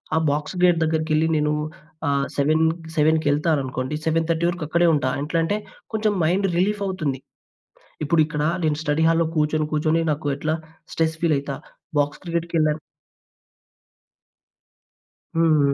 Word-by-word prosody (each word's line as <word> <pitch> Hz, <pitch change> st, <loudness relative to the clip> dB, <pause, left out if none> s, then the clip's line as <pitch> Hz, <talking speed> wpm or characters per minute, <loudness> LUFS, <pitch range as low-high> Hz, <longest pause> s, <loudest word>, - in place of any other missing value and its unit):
ఆ! -, -, +3 dB
Box 150 Hz, +5 st, -2 dB
gate 175 Hz, -2 st, +5 dB
దగ్గరకెళ్లి 160 Hz, 0 st, +1 dB
నేనూ 150 Hz, 0 st, +1 dB, 0.5 s
ఆహ్, 140 Hz, -1 st, +1 dB
సెవెన్ 155 Hz, +3 st, +2 dB, 0.3 s
సెవెన్‌కెళ్తాననుకోండి, 150 Hz, -3 st, +1 dB
7:30 165 Hz, +1 st, +1 dB
వరకు 175 Hz, -2 st, -4 dB
అక్కడే 170 Hz, +3 st, +3 dB
ఉంటా. 140 Hz, -4 st, +1 dB
ఎట్లంటే, 165 Hz, +6 st, 0 dB, 0.4 s
కొంచెం 215 Hz, -1 st, +1 dB
మైండ్ 185 Hz, +5 st, +2 dB
రిలీఫవుతుంది. 185 Hz, -7 st, 0 dB, 0.9 s
ఇప్పుడిక్కడా 150 Hz, -1 st, +2 dB, 0.2 s
నేను 150 Hz, -1 st, +1 dB
స్టడీ 150 Hz, +1 st, +1 dB
హాల్‌‌‌‌లో 165 Hz, 0 st, +3 dB
కూర్చొని, 155 Hz, 0 st, +1 dB
కూర్చొని 155 Hz, +2 st, +2 dB
నాకు 145 Hz, 0 st, -3 dB
ఎట్లా, 155 Hz, +2 st, -1 dB, 0.4 s
స్ట్రెస్ 160 Hz, -1 st, 0 dB
ఫీలయితా. 140 Hz, -4 st, 0 dB, 0.4 s
బాక్స్ 145 Hz, 0 st, 0 dB
క్రికెట్‌కెళ్ళా 170 Hz, -3 st, 0 dB, 2.6 s
హ్మ్. 155 Hz, -4 st, +4 dB
155 Hz, 110 wpm, -23 LUFS, 150-165 Hz, 2.6 s, gate